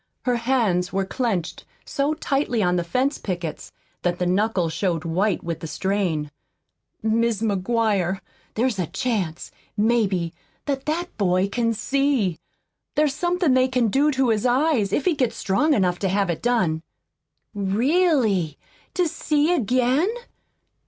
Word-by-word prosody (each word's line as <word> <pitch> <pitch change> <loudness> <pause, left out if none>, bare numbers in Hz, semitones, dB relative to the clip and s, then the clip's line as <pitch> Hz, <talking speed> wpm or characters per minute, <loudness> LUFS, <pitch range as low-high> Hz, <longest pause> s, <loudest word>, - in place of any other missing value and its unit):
Her 250 -1 +2
hands 225 -7 +1
were 195 0 0
clenched 190 -6 -2 0.2
so 285 +2 0
tightly 270 -7 0
on 180 -1 +2
the 175 - 0
fence 255 - 0
pickets 175 -5 -5 0.3
that 175 0 0
the 180 - -1
knuckles 185 -2 +1
showed 170 -2 -1
white 185 +4 0
with 165 -1 -3
the 160 - -6
strain. 175 -5 -1 0.7
"Mis' 225 0 +1
McGuire, 200 -2 +1 0.4
there's 230 -2 0
a 175 - 0
chance, 195 - -2 0.3
maybe, 205 -6 +1 0.3
that 275 -1 -3
that 345 +3 -2
boy 185 -1 +2
can 230 +2 0
see. 270 - +1 0.6
There's 300 -2 +2
somethin' 350 -1 +1
they 255 0 +4
can 250 -3 +1
do 280 +7 +3
to 265 -3 +1
his 215 -2 +1
eyes, 250 -5 +2
if 275 - 0
he 360 - +3
gets 255 -6 0
strong 290 +10 +2
enough 180 -3 +1
to 195 - 0
have 195 -1 +1
it 160 - -5
done." 190 -10 +1 0.7
"Really? 215 - +2 0.4
To 360 -2 +2
see 305 +1 +1
again?" 255 - +2
220 Hz, 145 wpm, -23 LUFS, 185-265 Hz, 0.7 s, they